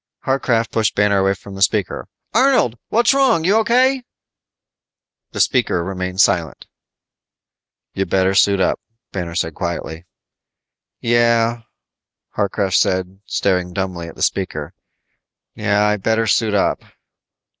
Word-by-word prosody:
Harcraft 120 -4 0
pushed 110 -1 0
Banner 100 -1 +2
away 95 +1 +1
from 100 +1 -12
the 95 - -8
speaker. 100 -1 0 0.3
"Arnold, 240 - +3
what's 235 +3 +3
wrong, 265 -11 +3
you 185 +4 +3
O.K.?" 255 +4 +3 1.3
The - - -6
speaker 85 - +1
remained 95 0 -2
silent. 85 -9 0 1.3
"You 95 - -2
better 95 0 +1
suit 100 0 +3
up," 95 - +1 0.3
Banner 85 -3 -5
said 80 -1 -1
quietly. 85 -1 -5 0.9
"Yeah," 115 0 +2 0.7
Harcraft 100 -2 0
said, 95 +1 -1
staring 90 -2 -1
dumbly 90 -3 -4
at 85 - -11
the - - -4
speaker. - - -2 0.8
"Yeah, 105 -1 +1
I 105 0 +1
better 110 +3 0
suit 110 -1 +1
up." 100 - +1
100 Hz, 125 wpm, -19 LUFS, 95-115 Hz, 1.3 s, Arnold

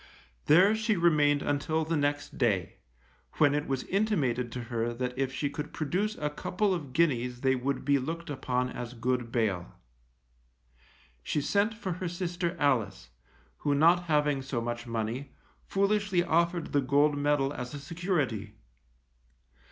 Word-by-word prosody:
There 180 +7 +6
she 220 0 +1
remained 150 -5 +3
until 155 +2 0
the 165 +1 -1
next 145 -1 -1
day, 105 -8 +1 0.6
when 145 -2 +4
it 150 0 -1
was 135 -1 -1
intimated 145 - 0
to 125 - -4
her 120 0 -2
that 125 0 -3
if 135 0 -1
she 145 +2 -1
could 150 +1 -6
produce 185 +8 -1
a 150 0 -2
couple 190 +6 0
of 150 -7 -4
guineas 125 -5 +1
they 130 -1 +3
would 130 +1 -2
be 140 0 +3
looked 165 +5 -5
upon 125 -2 -1
as 125 0 -6
good 120 0 -1
bail. 105 -8 -1 1.5
She 150 - -1
sent 205 +9 +1
for 195 -4 -4
her 185 - -1
sister 175 0 -2
Alice, 105 - 0 0.5
who 145 -1 0
not 170 +4 +4
having 150 -3 +2
so 135 -2 -3
much 120 +1 -4
money, 115 +4 -3 0.3
foolishly 200 -2 +1
offered 170 0 +1
the 145 - +4
gold 145 +3 +3
medal 145 -1 +1
as 125 +1 -6
a - - -6
security. 145 - -2
145 Hz, 150 wpm, -29 LUFS, 125-170 Hz, 1.5 s, There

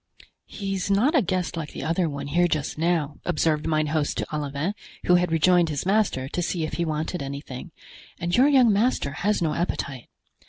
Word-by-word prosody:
"He's 195 -1 -3
not 215 - +3
a 295 - +5
guest 185 -3 -1
like 160 -3 -5
the - - -6
other 165 +1 +1
one 140 -1 -5
here 175 +5 +2
just 155 -4 -2
now," 160 -3 0
observed 155 0 0
mine 155 -1 +2
host 155 -2 0
to - - -1
Olivain, 145 +5 -2 0.3
who 180 - +4
had 180 -1 +3
rejoined 170 +1 +4
his 150 +1 -3
master 195 -10 +1
to 175 - -3
see 170 -1 -1
if 155 - -4
he 170 - -1
wanted 155 +2 -2
anything, 140 +2 -6 0.5
"and 175 +1 -1
your 255 +3 +6
young 255 -6 +5
master 210 - +1
has 190 +5 0
no 155 -2 +1
appetite." 140 -7 -3
165 Hz, 195 wpm, -25 LUFS, 150-185 Hz, 0.5 s, your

